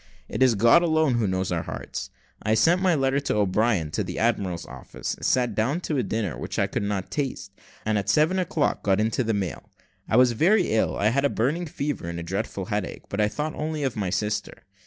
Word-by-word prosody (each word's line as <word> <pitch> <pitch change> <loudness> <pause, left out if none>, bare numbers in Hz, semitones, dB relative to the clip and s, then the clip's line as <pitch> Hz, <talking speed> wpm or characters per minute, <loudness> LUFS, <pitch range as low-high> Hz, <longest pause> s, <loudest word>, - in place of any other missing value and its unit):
It - - -5
is 130 -3 +5
God 115 +11 +6
alone 160 -4 +2
who 110 - +1
knows 95 0 -1
our - - 0
hearts. - - -6 0.3
I 110 +1 +1
sent 165 +11 +4
my 185 -3 +3
letter 135 -1 +1
to 140 - -2
O'Brien 100 -4 +1
to 105 - -1
the 90 -1 -6
admiral's 100 -7 0
office, 65 -1 -6
sat 125 -3 +1
down 125 - 0
to 155 -4 -2
a - - +2
dinner 105 - -2
which - - -5
I - - +3
could - - -3
not 100 -2 -3
taste, 135 -9 -3 0.3
and 110 -1 +1
at 100 +1 -4
seven 155 +9 +3
o'clock 165 -4 0
got 95 0 +2
into 110 +4 +1
the 115 -1 0
mail. 95 -6 -4 0.4
I 110 - +3
was 125 -1 +6
very 180 - +3
ill; 110 0 +1
I 105 - +3
had 140 +4 +1
a 140 - +3
burning 150 +11 -1
fever 140 - -3
and 85 0 -4
a - - -5
dreadful 95 +2 -3
headache, 105 0 -4
but 100 - -1
I 105 - +4
thought 150 +8 -3
only 155 -1 -3
of 130 -4 -1
my 100 -4 -1
sister. 105 +2 -2
110 Hz, 225 wpm, -25 LUFS, 100-145 Hz, 0.4 s, God